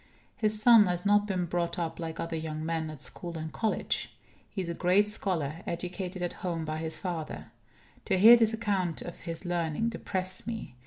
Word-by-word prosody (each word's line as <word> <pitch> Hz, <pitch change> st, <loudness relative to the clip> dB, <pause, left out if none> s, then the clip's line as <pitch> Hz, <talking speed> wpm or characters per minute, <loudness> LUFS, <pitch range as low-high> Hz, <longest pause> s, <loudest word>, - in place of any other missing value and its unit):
His 215 Hz, -1 st, +2 dB
son 220 Hz, -2 st, +7 dB
has 180 Hz, +1 st, -1 dB
not 205 Hz, 0 st, +4 dB
been 185 Hz, -3 st, 0 dB
brought 170 Hz, 0 st, -1 dB
up 165 Hz, -2 st, -3 dB
like 165 Hz, -1 st, -5 dB
other 165 Hz, 0 st, -3 dB
young 155 Hz, -1 st, -4 dB
men, 160 Hz, -1 st, -1 dB
at 150 Hz, -3 st, -7 dB
school 170 Hz, +6 st, -3 dB
and 160 Hz, 0 st, -5 dB
college. 220 Hz, -2 st, -1 dB, 0.4 s
He 190 Hz, -, -3 dB
is -, -, -6 dB
a 170 Hz, -, -2 dB
great 185 Hz, +4 st, +3 dB
scholar, 170 Hz, -7 st, -2 dB
educated 180 Hz, +1 st, -4 dB
at 175 Hz, -, -2 dB
home 170 Hz, -3 st, -2 dB
by 155 Hz, 0 st, -3 dB
his 160 Hz, 0 st, -4 dB
father. 170 Hz, -5 st, -5 dB, 0.5 s
To -, -, +2 dB
hear 225 Hz, +5 st, +10 dB
this 225 Hz, -2 st, +4 dB
account 200 Hz, -7 st, -1 dB
of 175 Hz, -, -8 dB
his 165 Hz, +1 st, -6 dB
learning 175 Hz, +4 st, 0 dB
depressed 185 Hz, -4 st, -4 dB
me. 220 Hz, -, -5 dB
175 Hz, 195 wpm, -29 LUFS, 165-205 Hz, 0.5 s, hear